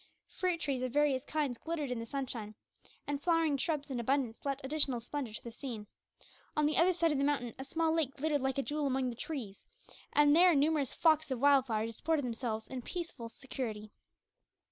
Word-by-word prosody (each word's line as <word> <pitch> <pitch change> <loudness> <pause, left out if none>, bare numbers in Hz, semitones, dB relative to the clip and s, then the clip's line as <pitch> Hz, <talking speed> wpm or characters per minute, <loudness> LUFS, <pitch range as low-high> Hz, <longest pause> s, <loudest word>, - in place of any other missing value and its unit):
Fruit 360 -2 0
trees 275 -4 -1
of 255 -1 -2
various 285 -2 +2
kinds 290 -6 -2
glistened 310 -5 -3
in 245 - -2
the 230 - -6
sunshine, 235 -6 -4 0.5
and 285 -1 -2
flowering 330 -2 +2
shrubs 290 0 -2
in 250 - -2
abundance 250 -1 0
lent 275 -1 -1
additional 275 -3 +2
splendour 240 -1 -4
to - - -8
the 235 - -7
scene. 230 -3 -6 0.7
On 300 - +4
the 300 - +2
other 350 +2 +5
side 335 -2 +2
of 290 - 0
the - - +2
mountain 275 -5 0
a - - -3
small 320 +3 0
lake 310 -5 0
glittered 295 0 +1
like 265 0 0
a 275 - +1
jewel 295 0 -1
among 260 -1 0
the - - -8
trees; 235 -8 -6 0.4
and 295 0 +5
there 350 0 +7
numerous 290 -2 +2
flocks 315 -2 +3
of 260 -3 -2
wild 275 -1 +5
fowl 220 -2 0
disported 285 +6 -1
themselves 230 -2 -3
in 260 -1 -6
peaceful 300 -6 -5
security. 225 -4 -5
275 Hz, 200 wpm, -33 LUFS, 245-305 Hz, 0.7 s, there